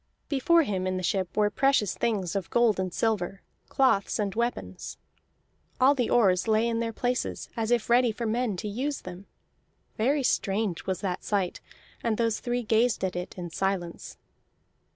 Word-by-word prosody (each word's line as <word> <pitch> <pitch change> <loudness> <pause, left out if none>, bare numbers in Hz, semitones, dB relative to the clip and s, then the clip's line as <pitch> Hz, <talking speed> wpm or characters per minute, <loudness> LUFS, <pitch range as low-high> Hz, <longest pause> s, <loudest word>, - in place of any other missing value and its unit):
Before 325 +4 +4
him 190 -7 -2
in 185 0 -1
the 185 - -4
ship 185 0 -1
were 210 -1 +3
precious 270 -6 +2
things 200 -7 -1
of 195 -3 -2
gold 235 -5 +3
and 185 -1 -1
silver, 195 -3 -1 0.3
cloths, 255 -7 +2
and 205 -2 -1
weapons. 220 - -3 0.8
All 265 +2 +6
the 250 -4 -1
oars 195 -4 +3
lay 220 +1 +3
in 230 -1 0
their 230 0 -1
places 245 +2 -2
as 225 -2 -1
if 240 -2 +1
ready 240 0 +4
for 230 +2 -5
men 225 -2 0
to 210 - -4
use 265 +8 -3
them. 185 +2 -9 0.7
Very 270 +6 +2
strange 200 -6 0
was 190 -1 -2
that 185 -3 -3
sight, 195 -4 -1 0.4
and 225 -2 0
those 230 -2 +1
three 245 0 -2
gazed 225 +1 +2
at 185 -2 -1
it 180 +1 -5
in 175 -2 -6
silence. 185 -2 -3
215 Hz, 170 wpm, -27 LUFS, 190-240 Hz, 0.8 s, All